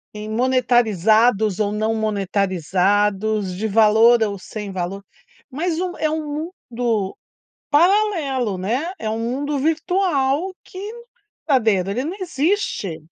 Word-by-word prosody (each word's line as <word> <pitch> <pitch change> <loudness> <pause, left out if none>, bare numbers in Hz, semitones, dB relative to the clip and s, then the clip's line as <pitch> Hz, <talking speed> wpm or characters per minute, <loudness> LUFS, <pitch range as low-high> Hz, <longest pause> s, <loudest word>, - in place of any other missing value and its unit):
em 210 0 -6
monetarizados 225 -4 +2
ou 205 -1 +1
não 215 +1 0
monetarizados, 200 0 0
de 220 +4 -2
valor 225 +2 +5
ou 205 -2 -2
sem 205 0 -7
valor, 190 +2 -4 0.5
mas 325 +4 -2
um 360 -1 -3
é 310 - 0
um 310 0 -3 0.5
mundo 230 -5 -1 0.6
paralelo, 305 - +2
né, 250 - -2
é 215 -1 -2
um 220 - -2
mundo 275 +5 -2
virtual 320 0 0
que 370 - -11
não 470 0 -12 0.4
é 275 -3 +5
verdadeiro. 195 -4 +1
Ele 245 +6 -2
não 340 +6 -4
existe. 300 - -1
225 Hz, 130 wpm, -21 LUFS, 205-290 Hz, 0.6 s, valor